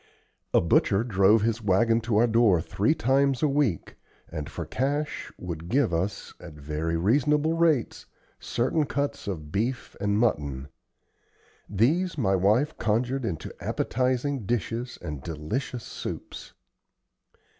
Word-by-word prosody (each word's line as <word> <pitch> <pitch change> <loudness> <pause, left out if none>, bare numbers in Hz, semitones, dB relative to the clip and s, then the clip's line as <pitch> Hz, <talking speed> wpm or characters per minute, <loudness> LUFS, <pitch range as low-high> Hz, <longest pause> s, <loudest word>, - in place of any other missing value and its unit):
A - - +4
butcher 95 +5 +3
drove 105 -1 +4
his 115 +1 0
wagon 115 +3 +3
to 115 -2 0
our 115 - +5
door 115 -6 +4
three 100 - 0
times 135 +1 +2
a - - +5
week 135 - 0 0.3
and, 75 -3 -5
for - - -5
cash, 145 +3 -2
would 85 -1 -6
give 125 -7 +2
us, 90 +5 -2
at 80 - -10
very 75 +3 -3
reasonable 150 - +2
rates, 165 -8 +1 0.3
certain 135 +5 0
cuts 140 -4 -2
of 75 -7 -5
beef 120 +6 -2
and 100 0 +1
mutton. 70 - 0 1.0
These 155 - +1
my 95 -8 +2
wife 110 - +2
conjured 120 +4 0
into 80 -6 -4
appetizing 130 -1 -1
dishes 120 +2 -2
and 75 -5 -5
delicious 95 - -4
soups. - - -7
115 Hz, 130 wpm, -26 LUFS, 90-135 Hz, 1.0 s, our